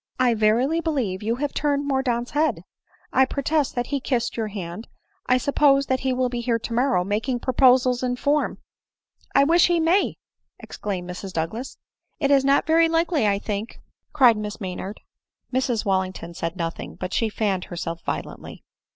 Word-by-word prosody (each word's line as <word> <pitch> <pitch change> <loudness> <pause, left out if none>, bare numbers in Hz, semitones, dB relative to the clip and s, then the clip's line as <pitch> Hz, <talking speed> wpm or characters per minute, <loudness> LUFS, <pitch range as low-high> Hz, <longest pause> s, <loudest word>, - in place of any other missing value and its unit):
I 250 -2 +4
verily 235 +9 +2
believe 255 - -1
you 225 +2 0
have 285 +2 -3
turned 285 -1 0
Mordaunt's 250 -3 0
head; 290 - 0 0.3
— - - -34
I 265 - +5
protest 285 +2 -1
that 245 0 -1
he 280 - +1
kissed 250 -3 -1
your 225 -2 -2
hand; 195 0 -7 0.2
— - - -43
I 255 - +4
suppose 275 +1 +3
that 260 -1 0
he 265 0 -1
will 255 0 +1
be 245 -1 -3
here 235 -1 +1
tomorrow, 235 -3 0
making 220 +6 -1
proposals 255 0 +3
in 250 -1 -1
form." 290 +4 0 0.4
" - - -35
I 275 - +6
wish 335 +4 +5
he 345 -1 +2
may 335 +5 +2 0.2
!" - - -57
exclaimed 185 -4 -5
Mrs 180 +1 -7
Douglas. 175 +11 -4 0.2
" - - -53
It 280 -2 +1
is 275 -1 +5
not 275 +1 +3
very 325 +1 +4
likely, 330 -6 +1
I 200 -1 +2
think," 205 +2 -5 0.3
cried 250 -7 +5
Miss 210 -1 -5
Maynard. 190 +1 -6 0.5
Mrs 250 -3 0
Wallington 185 -3 -1
said 165 +1 -4
nothing; 165 -2 -5
but 185 - -5
she 225 - +1
fanned 200 -4 -1
herself 170 -1 -5
violently. - - -6
245 Hz, 185 wpm, -23 LUFS, 205-275 Hz, 0.5 s, I